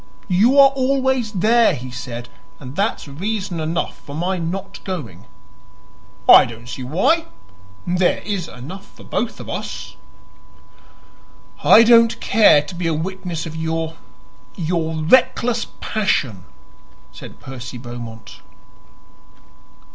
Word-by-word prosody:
"You 230 +10 +4
are 275 -1 +9
always 265 -3 0
there," 225 +4 +3
he 125 +1 -8
said, 125 -1 -7 0.3
"and 130 -1 -9
that's 200 -4 -1
reason 190 +4 -4
enough 160 +2 -3
for 145 - -10
my 180 +3 -1
not 195 +4 -5
going." 135 - -6 1.0
"I - - +10
don't 115 +1 -10
see 125 - -7
why. 225 - +1 0.6
There 180 0 +1
is 195 -5 -3
enough 180 +11 -10
for - - -17
both 235 +1 -3
of - - -9
us." - - -6 1.7
"I 230 - +8
don't 230 0 +5
care 205 -10 +5
to 150 - -9
be 175 -1 -3
a 165 - 0
witness 175 0 -4
of 160 -1 -7
your 160 0 -3 0.6
your 165 -2 -2
reckless 235 +4 +3
passion," 130 - -1 0.7
said - - -12
Percy 125 -1 -8
Beaumont. 120 -2 -9
175 Hz, 120 wpm, -20 LUFS, 140-215 Hz, 1.7 s, I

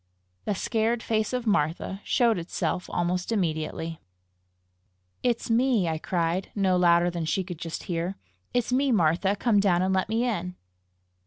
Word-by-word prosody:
The 205 - 0
scared 225 +3 0
face 220 -1 0
of 250 -1 -2
Martha 190 0 0
showed 235 -6 +2
itself 175 +1 -3
almost 180 +3 -1
immediately. 165 -4 -2 1.2
"It's 240 -2 0
me!" 230 -5 +3
I 160 -1 -1
cried, 170 +2 -1
no 190 -3 +2
louder 175 0 +4
than 170 -2 -3
she 190 +4 0
could 175 -3 -8
just 165 -1 -5
hear; 175 +2 -3 0.3
"it's 245 0 0
me, 270 +1 +2
Martha! 185 0 +2
Come 210 0 +2
down 185 -3 +3
and 190 +1 +1
let 190 +1 0
me 225 +2 +1
in." 180 -6 -2
185 Hz, 155 wpm, -26 LUFS, 170-225 Hz, 1.2 s, louder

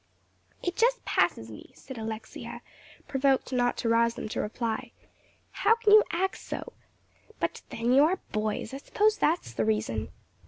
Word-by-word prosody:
"It 355 0 -1
just - - +2
passes - - +1
me," - - -12
said 265 -4 -9
Alexia, 220 0 -6 0.4
provoked 270 -1 +1
not 245 -1 +1
to 230 - -1
rouse 230 0 +3
them - - -5
to - - -2
reply, 225 +1 -3 0.6
"how 455 - +3
you 425 0 +9
can 340 - -1
act 380 - -1
so. 485 - -6 0.7
But - - -2
then, 235 +2 0
you 275 +2 +7
are 365 +4 +1
boys. 215 +2 -2
I - - -3
suppose 425 +9 +1
that's 310 - +1
the 115 - 0
reason." 110 -3 -1
245 Hz, 160 wpm, -28 LUFS, 220-350 Hz, 0.7 s, you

